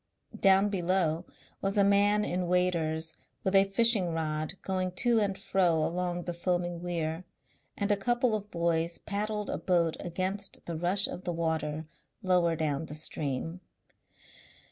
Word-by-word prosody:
Down 195 +1 +5
below 180 -3 0 0.4
was 195 +1 -1
a 200 - +6
man 205 +1 +4
in 180 0 -1
waders 165 -3 0 0.3
with 190 - 0
a 195 0 +6
fishing 195 -4 +3
rod 155 +1 -2
going 185 -1 -1
to 235 +4 +3
and 200 -2 0
fro 180 -4 +2
along 175 +2 -1
the 175 - -4
foaming 175 0 -1
weir, 165 -1 -2 0.5
and 200 +1 0
a - - +5
couple 240 +3 +1
of 210 -1 -3
boys 170 -1 0
paddled 210 0 -3
a - - -2
boat 170 -3 +1
against 190 +3 -3
the 170 - -4
rush 180 +4 +1
of 180 - -7
the 175 - -2
water 160 -2 -2 0.4
lower 180 -3 +3
down 155 -1 -1
the 150 - -7
stream. 155 +3 -3
180 Hz, 150 wpm, -30 LUFS, 165-195 Hz, 0.5 s, a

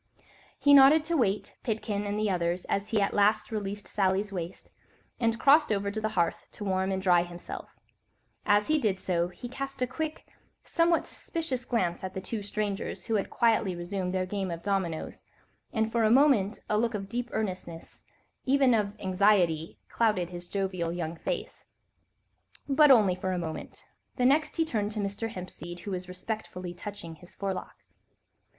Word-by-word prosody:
He 285 - +5
nodded 285 +3 +8
to 335 +1 0
Waite, 210 -8 0
Pitkin 210 -2 -2
and 205 +1 -2
the 215 0 +1
others 175 -2 0
as 200 +1 -1
he 220 - +2
at 200 - +1
last 210 +2 +3
released 205 -1 -4
Sally's 200 +1 0
waist, 175 -1 -6 0.5
and 230 -1 +1
crossed 295 0 +5
over 200 -1 0
to 220 +1 -4
the 215 - 0
hearth 170 -1 0
to - - -7
warm 190 -1 0
and 190 - 0
dry 180 -2 +4
himself: 175 0 -7 0.7
as 205 0 +3
he 310 0 +3
did 205 -7 0
so, 175 -2 0
he 180 +7 -9
cast 275 +2 -6
a 250 - +2
quick, 310 +5 -4 0.4
somewhat 335 0 +2
suspicious 275 -7 -4
glance 185 -10 -1
at 190 0 -5
the - - -2
two 210 +3 -4
strangers, 205 0 -3
who 225 - -2
had 205 -3 0
quietly 225 -5 +2
resumed 180 +1 -3
their 185 0 0
game 195 0 -3
of 170 -1 -5
dominoes, 190 -5 -2 0.5
and 220 -1 0
for 235 -1 +2
a 215 - +4
moment 240 -5 +4
a 210 - +1
look 230 -1 0
of 195 -1 -4
deep 240 +3 -3
earnestness, 185 -6 -5 0.4
even 270 -1 +4
of 210 -2 0
anxiety, 185 -4 +2
clouded 210 -7 +1
his 175 0 -8
jovial 185 -4 -1
young 170 -1 -3
face. - - -5 1.0
But 295 +1 +5
only 215 -8 +6
for 185 +1 -2
a - - -1
moment; 160 -2 -6 0.3
the 250 - +1
next 295 +4 +3
he 330 - +2
had 320 - -7
turned 210 -2 -1
to 215 - -3
Mr. 200 +3 -2
Hempseed, 175 -2 -8
who 200 - -6
was 180 -1 -4
respectfully 185 -2 -5
touching 175 -4 -8
his 175 - -16
forelock. 195 -2 -4
205 Hz, 180 wpm, -29 LUFS, 185-230 Hz, 1.0 s, nodded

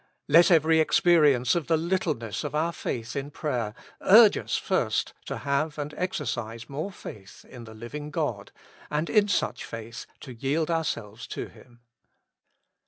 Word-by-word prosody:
Let 170 +5 +6
every 160 -2 +4
experience 150 -7 +4
of 170 -3 -1
the 165 -1 +3
littleness 160 - -2
of 150 0 -4
our 165 +3 0
faith 120 -5 -4
in 140 0 -3
prayer 125 -9 -3 0.3
urge - - +8
us - - -2
first - - 0
to - - -3
have 145 +3 -1
and 145 0 -4
exer 180 +4 -3
cise 115 0 -4
more 155 +8 -4
faith 100 - -11
in 120 -2 -11
the 110 -1 -12
Hving 145 +7 -7
God, - - -3 0.4
and 150 +2 -1
in 210 -2 +4
such 180 -10 -1
faith 115 +1 -8
to 130 - -9
yield 145 +7 -1
ourselves 120 -9 -3
to - - -5
Him. 120 -1 -19
145 Hz, 160 wpm, -26 LUFS, 120-160 Hz, 0.4 s, urge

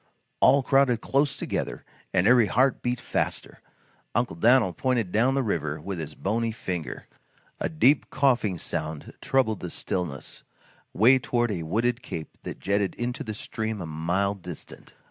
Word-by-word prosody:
All 140 -1 +5
crowded 135 -4 +3
close 140 +1 +1
together - - -3 0.3
and 90 -1 +2
every 120 -1 +6
heart 130 +5 +2
beat 125 0 -1
faster. - - -3 0.5
Uncle 120 -5 0
Dan'l 110 0 +4
pointed 120 -2 0
down 125 +6 +3
the 135 - +1
river 80 -8 -2
with 90 +3 -5
his 75 -1 -6
bony 115 +3 -1
finger. 90 -7 -5 0.5
A - - -1
deep 150 -3 +3
coughing 125 -9 +2
sound 80 -1 -4
troubled 115 -6 +1
the 90 - -5
stillness, 85 -6 -4 0.5
way 125 +7 +5
toward 120 -2 0
a 90 -5 -2
wooded 115 +9 0
cape 80 -10 -7
that - - -7
jetted 100 0 0
into 120 +1 -3
the 110 -1 -5
stream 110 -1 -4
a 90 - -4
mile 85 +6 0
distant. 90 -4 -11
110 Hz, 155 wpm, -26 LUFS, 90-125 Hz, 0.5 s, every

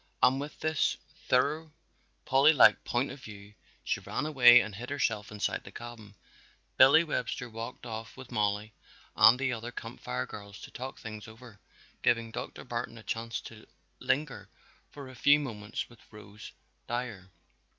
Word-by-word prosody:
And 130 +2 +5
with 145 +1 -8
this 155 -1 +1 0.3
thoroughly 150 +5 +2 0.6
Polly 140 +4 +5
like 145 - +6
point 125 +3 -1
of 140 - -9
view 105 -1 -11 0.3
she - - -1
ran - - -4
away 125 -5 +8
and 110 -3 -3
hid 120 +5 -7
herself 115 -7 -1
inside 105 -1 -2
the - - -11
cabin. 115 -4 -10 0.6
Billy 140 +5 +7
Webster 125 -5 -3
walked 115 +2 -8
off 115 0 -7
with 130 -2 -11
Mollie 105 0 -1 0.4
and 115 - +7
the 130 -1 -1
other 120 +1 -6
Camp - - -8
Fire 65 +1 -3
girls 100 -1 -10
to - - -10
talk 130 +2 -7
things 110 -1 -8
over, 110 -1 -14 0.4
giving 115 -1 +1
Dr. - - -6
Barton 120 -1 -5
a 110 - -12
chance 115 +1 -3
to 110 -2 -12 0.3
linger 145 -1 -2 0.4
for 140 -2 -10
a 130 - -11
few 145 +4 +5
moments 110 -6 -5
with 120 -2 -18
Rose 105 0 -12 0.4
Dyer. 115 -6 -4
120 Hz, 160 wpm, -30 LUFS, 110-130 Hz, 0.6 s, away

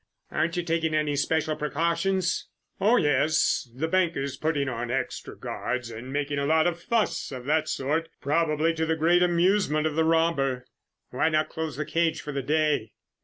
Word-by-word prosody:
"Aren't 165 +2 0
you 175 - 0
taking 165 -2 0
any 150 -1 +1
special 155 +2 0
precautions?" 170 +5 0 0.3
"Oh, 225 +5 +4
yes, 150 - +2
the 135 +7 -3
bank 175 0 +1
is 135 0 -3
putting 150 -3 -1
on 120 -1 -3
extra 130 +1 -3
guards 120 -1 -4
and 115 +4 -8
making 145 0 -1
a 140 - 0
lot 160 +1 +3
of 175 -1 -1
fuss 230 -5 0
of 125 -2 -7
that 155 +2 +1
sort, 155 +5 -1
probably 155 +2 +1
to 160 0 -1
the 160 - +1
great 170 +3 +3
amusement 175 -2 +2
of 155 - 0
the 160 +1 +2
robber." 160 -6 +1 0.5
"Why 130 +5 +1
not 155 0 +1
close 160 -4 -4
the 150 - -2
cage 165 +1 0
for 150 - -6
the 140 -1 -2
day?" 150 -5 0
155 Hz, 180 wpm, -26 LUFS, 140-165 Hz, 0.5 s, Oh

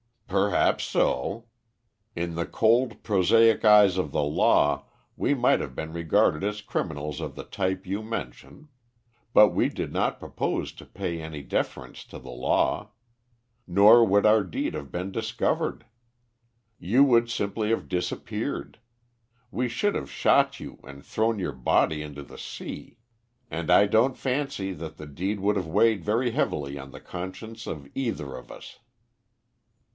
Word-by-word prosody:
"Perhaps 100 0 +2
so. 100 - 0 0.7
In 85 0 -3
the 85 0 -1
cold, 115 +4 +1
prosaic 110 +3 +4
eyes 105 -3 +7
of 80 -6 -1
the - - +1
law 75 0 +2 0.3
we - - +1
might 125 -2 +3
have 65 -3 -6
been 80 +3 -5
regarded 85 -1 +2
as 105 +1 -2
criminals 75 -6 -4
of 75 -4 -6
the - - -7
type 95 -1 -3
you 100 +3 -3
mention; 115 - -7 0.6
but 105 - +8
we - - +1
did - - -5
not - - -1
propose - - -3
to - - -14
pay 90 -4 -5
any 80 -2 -7
deference 65 - -3
to - - -11
the - - -10
law. 65 - 0 0.8
Nor 105 +6 +7
would 100 0 +3
our 105 0 +5
deed 90 - -3
have 70 - -6
been 90 +2 -4
discovered. 110 +2 -2 0.9
You 120 +10 +4
would 120 -4 +4
simply 105 -1 -2
have 115 - -1
disappeared; 90 +3 -4 0.7
we 125 +1 -1
should 165 - 0
have - - -4
shot - - +2
you - - -9
and 70 +1 -12
thrown 110 0 0
your 90 -6 -3
body 70 +4 +1
into 75 -1 -8
the - - -13
sea. - - -8 0.5
And 80 -1 -4
I 105 - +7
don't 115 +6 +2
fancy 130 -7 -2
that 80 -2 -8
the 75 - -8
deed 95 +8 -3
would 105 +1 +1
have 90 -4 -2
weighed 105 +3 +2
very 115 +4 +1
heavily 70 -8 -2
on 70 0 -9
the - - -11
conscience 105 +5 -8
of 70 -3 -6
either 90 - -3
of - - -11
us." - - -12
95 Hz, 155 wpm, -26 LUFS, 80-110 Hz, 0.9 s, but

